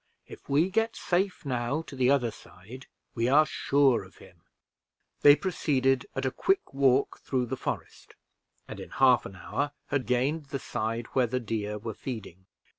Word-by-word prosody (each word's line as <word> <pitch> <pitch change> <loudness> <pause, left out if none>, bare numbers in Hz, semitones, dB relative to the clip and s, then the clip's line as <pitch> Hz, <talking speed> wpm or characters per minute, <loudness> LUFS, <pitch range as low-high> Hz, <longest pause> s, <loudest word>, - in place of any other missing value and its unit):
If - - -13
we 155 +7 +2
get 225 +2 +1
safe 185 -1 -1
now 130 +4 -1
to 145 - -11
the 130 -1 +2
other 130 -5 +2
side, 110 +6 -13 0.3
we 115 0 0
are 150 +3 +6
sure 140 -4 +2
of - - -17
him." - - -17 0.8
They 145 0 +9
proceeded 135 -8 0
at - - -2
a 130 - +1
quick 385 - 0
walk 135 -1 +2
through 130 -2 -1
the - - -3
forest, - - -6 0.5
and - - -8
in - - -8
half 130 -3 +4
an 95 - -12
hour 145 +10 -3 0.2
had 135 -5 -1
gained 135 +6 0
the 140 - -3
side 115 -2 -3
where 130 -2 +3
the 125 +2 -1
deer 105 -2 -3
were 110 +1 -5
feeding. 100 -7 -8
130 Hz, 175 wpm, -28 LUFS, 120-145 Hz, 0.8 s, They